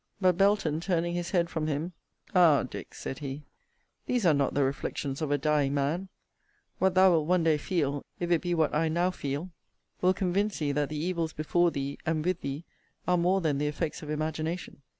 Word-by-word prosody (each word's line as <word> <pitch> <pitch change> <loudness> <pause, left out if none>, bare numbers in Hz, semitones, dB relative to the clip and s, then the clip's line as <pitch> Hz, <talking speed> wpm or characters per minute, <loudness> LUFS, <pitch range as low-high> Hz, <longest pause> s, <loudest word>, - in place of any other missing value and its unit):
But 185 -3 +4
Belton 195 -5 +2
turning 170 -1 0
his 175 0 -2
head 175 -3 +2
from 160 -2 -3
him, 155 +4 -2 0.4
Ah, 170 -6 +6
Dick! - - -8
(said 135 - -6
he,) 140 0 -6 0.6
these 245 -5 +1
are 165 - +6
not 140 -2 +1
the 145 - +3
reflections 135 +1 -3
of 155 - -1
a 145 - +2
dying 145 -1 +1
man! 155 +7 -1 0.7
What 190 -1 +2
thou 185 0 +7
wilt 160 -3 +2
one 180 -1 +3
day 160 -2 +3
feel, 145 -4 -1 0.2
if 175 0 -2
it 170 - +3
be 175 -1 -1
what 160 -3 +1
I 160 +1 +2
now 175 +3 +1
feel, 145 +2 -4 0.5
will 185 +1 +4
convince 195 +2 0
thee 145 -2 0
that 145 0 0
the 155 - -4
evils 165 0 -1
before 175 +3 +2
thee, 140 -2 -4
and 160 -1 -1
with 180 -1 0
thee, 140 +3 -4 0.4
are 180 - +4
more 180 +3 +2
than 150 -4 0
the 150 - 0
effects 150 +1 -3
of 150 - -8
imagination. 155 +1 -3
160 Hz, 205 wpm, -29 LUFS, 145-180 Hz, 0.7 s, thou